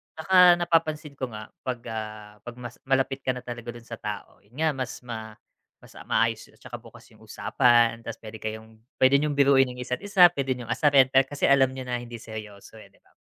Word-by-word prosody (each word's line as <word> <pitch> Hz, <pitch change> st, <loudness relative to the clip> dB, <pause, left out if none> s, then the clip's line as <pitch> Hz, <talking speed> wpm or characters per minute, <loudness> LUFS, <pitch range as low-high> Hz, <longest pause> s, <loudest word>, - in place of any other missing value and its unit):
Tsaka 180 Hz, +2 st, +6 dB
napapansin 160 Hz, -3 st, 0 dB
ko 135 Hz, -2 st, -5 dB
nga 110 Hz, -2 st, -10 dB, 0.2 s
'pag, 125 Hz, -2 st, -2 dB
ah, 110 Hz, -1 st, -7 dB
'pag 120 Hz, -, -7 dB
mas 125 Hz, -1 st, -10 dB
malapit 135 Hz, 0 st, +1 dB
ka 130 Hz, -1 st, -2 dB
na 125 Hz, -, -8 dB
talaga 120 Hz, -1 st, -7 dB
dun 120 Hz, -, -12 dB
sa 115 Hz, -1 st, -9 dB
tao, 105 Hz, -1 st, -7 dB
yun 105 Hz, +5 st, -26 dB
nga, 160 Hz, +2 st, +1 dB
mas 130 Hz, -3 st, -6 dB
ma 110 Hz, -3 st, -7 dB, 0.5 s
mas, -, -, -16 dB
ah, -, -, -13 dB
maayos -, -, 0 dB
at -, -, -23 dB
tsaka -, -, -8 dB
bukas -, -, -16 dB
yung -, -, -21 dB
usapan, 120 Hz, -1 st, +2 dB
tas 115 Hz, 0 st, -7 dB
puwede 110 Hz, 0 st, -11 dB
kayong 110 Hz, 0 st, -8 dB, 0.2 s
puwede 130 Hz, +2 st, +4 dB
niyong 150 Hz, 0 st, -1 dB
biruin 135 Hz, -1 st, +4 dB
ang 125 Hz, 0 st, -7 dB
isa't 125 Hz, 0 st, -3 dB
isa, 195 Hz, -4 st, +5 dB
puwede 135 Hz, -5 st, -2 dB
niyong 120 Hz, -2 st, -7 dB
asarin 135 Hz, 0 st, +4 dB
dahil 135 Hz, 0 st, +4 dB
kasi 145 Hz, +1 st, -8 dB
alam 135 Hz, -1 st, +4 dB
niyo 130 Hz, -, -6 dB
na 125 Hz, -1 st, -3 dB
hindi 120 Hz, 0 st, -9 dB
seryoso, 110 Hz, -2 st, -10 dB
eh, 105 Hz, -, -14 dB
'di 100 Hz, -, -30 dB
ba? -, -, -30 dB
125 Hz, 220 wpm, -25 LUFS, 115-140 Hz, 0.5 s, Tsaka